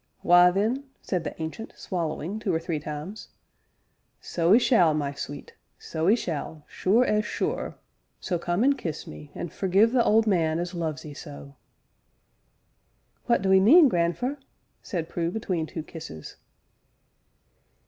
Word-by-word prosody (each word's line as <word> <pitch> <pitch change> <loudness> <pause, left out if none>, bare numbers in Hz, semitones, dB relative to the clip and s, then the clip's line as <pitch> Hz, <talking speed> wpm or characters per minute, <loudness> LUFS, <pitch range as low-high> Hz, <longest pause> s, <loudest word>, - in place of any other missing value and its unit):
Why, 175 0 +7
then," 220 +9 0 0.2
said 180 -4 -2
the 145 - -6
Ancient, 160 +8 -6
swallowing 175 +2 -3
two 210 -3 -1
or 165 - +1
three 165 -2 -3
times, 150 +8 -7 0.9
"so 175 +3 +2
'ee - - +8
shall, 185 - +4
my 145 -2 -2
sweet 140 0 -8 0.2
so 160 +2 -2
'ee 215 - +6
shall, 155 -6 -5
sure 225 +7 +2
as 210 -2 +1
sure, - - -3 0.4
so 175 -3 -2
come 175 +5 0
an' 280 +2 +5
kiss 165 - -5
me, 75 -1 -11
an' 175 - -5
forgive 195 +7 +2
the 245 -2 +3
old 220 0 +4
man 165 -6 +1
as 175 +2 -3
loves 160 -4 -4
'ee 150 - -8
so." 70 - -10 1.7
"What 235 -5 +2
do 190 0 +3
'ee 190 - +7
mean, 285 - +7
grandfer?" 205 +11 -1 0.4
said 165 -4 -4
Prue 170 0 -2
between 180 -5 -2
two 160 - -6
kisses. 160 - -10
175 Hz, 150 wpm, -26 LUFS, 160-210 Hz, 1.7 s, ee